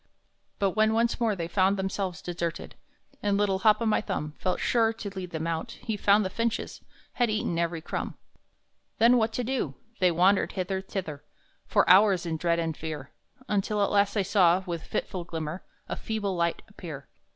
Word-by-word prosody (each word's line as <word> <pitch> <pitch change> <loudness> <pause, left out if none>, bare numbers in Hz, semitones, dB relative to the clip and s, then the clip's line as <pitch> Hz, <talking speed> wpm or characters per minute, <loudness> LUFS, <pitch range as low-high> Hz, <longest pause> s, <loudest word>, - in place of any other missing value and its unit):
But 195 -1 +1
when 220 +2 +2
once 235 +2 +1
more 225 -3 +1
they 170 -3 -3
found 190 +3 +2
themselves 190 -2 -3
deserted, 170 -1 -4 0.5
And 205 -1 +1
little 200 -2 +1
Hop 215 0 +4
o' - - 0
my 220 - +2
Thumb 150 -8 -4
Felt 185 -1 -1
sure 225 -2 +2
to 220 -2 -6
lead 185 -2 -5
them 160 -1 -4
out, 165 +8 -3
he 230 -3 -4
found 205 0 +4
the 185 - -3
finches 230 +1 -2 0.3
Had 245 -2 +1
eaten 210 -5 -1
every 170 -1 -1
crumb! - - -4 0.8
Then 235 +2 +6
what 220 -1 +2
to 250 - -1
do! 240 - -2 0.2
They 185 - +5
wandered 185 +4 +3
hither, 190 0 -2
thither, 180 -7 -5 0.4
For - - +3
hours 190 -1 +6
in 165 -1 -2
dread 170 +1 +1
and 165 -2 -1
fear, 155 -3 -6 0.4
Until 210 0 0
at - - 0
last 200 0 +3
they 205 - +2
saw, 185 -2 +4
with 170 -3 -4
fitful 180 +2 -4
glimmer, 165 0 -5 0.3
A - - -3
feeble 205 -4 -3
light 170 -1 0
appear. 165 -10 -9
190 Hz, 185 wpm, -27 LUFS, 170-215 Hz, 0.8 s, Then